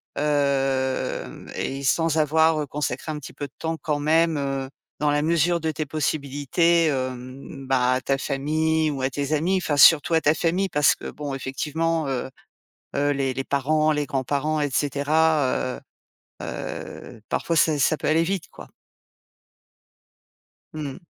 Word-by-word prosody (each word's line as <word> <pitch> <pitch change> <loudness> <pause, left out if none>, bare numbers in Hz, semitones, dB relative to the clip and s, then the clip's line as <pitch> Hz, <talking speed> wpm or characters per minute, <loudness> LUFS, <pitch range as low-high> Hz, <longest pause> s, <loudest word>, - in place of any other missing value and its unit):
Hem, 135 -3 -1
et 135 +1 -3
sans 160 +3 +2
avoir, 160 +1 +3
heu, 145 - -4
consacré 150 +2 -3
un 150 - -4
petit 145 - -10
peu 145 - -5
de 135 - -32
temps 160 0 -3
quand 150 -2 -1
même, 160 +1 +2
heu, 135 -1 -2 0.3
dans 150 - +2
la 145 0 +1
mesure 170 +1 +2
de 160 -1 -1
tes 155 -1 -4
possibilités, 155 +3 +1
hem, 130 0 -4
bah, 130 -1 +2
à 130 - 0
ta 135 +1 0
famille 155 +3 0
ou 135 -2 -4
à 130 - +1
tes 140 +2 -2
amis, 170 +6 +1
enfin 160 -5 -1
surtout 155 +2 +7
à 160 - +4
ta 150 - +4
famille. 180 +4 0
Parce 150 -3 +4
que - - -8
bon 145 -2 -6
effectivement, 155 +4 -2
heu, 130 -1 -2 0.7
heu, 145 +1 +2
les 135 -2 -1
les 135 - -2
parents, 155 +3 +1
les 150 -1 -1
grands-parents, 145 +3 -1
et 145 - 0
cetera, 145 -1 +1
heu, - - -12 0.7
heu, 115 - -7
parfois 170 - -1
ça 155 -1 +3
ça 150 +3 +3
peut - - -3
aller 160 +2 +3
vite, 190 -1 -2
quoi. - - -13 2.1
Mmh 155 - -4
mh. 170 +6 -14
150 Hz, 165 wpm, -24 LUFS, 135-160 Hz, 2.1 s, surtout